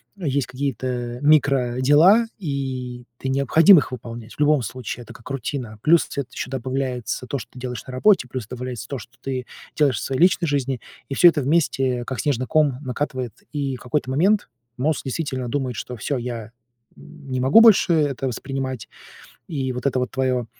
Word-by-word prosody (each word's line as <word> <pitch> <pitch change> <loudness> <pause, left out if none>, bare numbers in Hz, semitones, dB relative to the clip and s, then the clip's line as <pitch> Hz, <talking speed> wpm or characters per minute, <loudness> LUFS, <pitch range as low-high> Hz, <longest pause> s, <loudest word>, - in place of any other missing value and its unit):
есть 140 -8 -1
какие-то 125 -2 -3
микродела, 145 - +4
и 130 -6 -4
ты 130 - -4
необходим 155 +7 +6
их 145 - +1
выполнять. 115 -2 -8
В - - -25
любом 150 -2 +4
случае, 120 +1 -6
это - - -12
как 120 - -13
рутина. 125 -4 -4
Плюс, 165 +2 +4
цвет 140 -3 -4
еще - - -5
добавляется 130 -1 -3
то, 140 - -2
что - - -9
ты 125 - -12
делаешь 125 -3 -5
на 130 - -8
работе, 155 0 +3
плюс 125 -5 -5
добавляется 125 -1 -6
то, 140 - -4
что 115 +2 -12
ты 130 -2 -3 0.3
делаешь 140 -5 +2
в - - -4
своей 135 +3 -2
личной 180 -2 +4
жизни. 135 -3 -1 0.3
И - - -3
всё 175 - +7
это 160 -4 +4
вместе, 135 -4 +1
как 130 - -4
снежный 130 -4 -1
ком, 150 -5 +2
накатывает. 130 -2 -3 0.2
И 140 -3 -2
какой-то 130 +2 -2
момент 190 +6 +2 0.3
мозг 150 +4 0
действительно 130 -3 -3
думает, 130 -4 -2
что- 125 - -5
всё, 140 +5 -2
я, 120 -2 -5 0.5
м, 145 -4 -13
не 130 - -1
могу 140 - +7
больше 210 -6 +6
это 140 -4 +1
воспринимать, 130 0 -4 0.6
и 135 -5 -2
вот 125 +2 -6
эта 130 - 0
вот 125 - -2
твоё 130 -2 0
130 Hz, 180 wpm, -22 LUFS, 125-145 Hz, 0.6 s, всё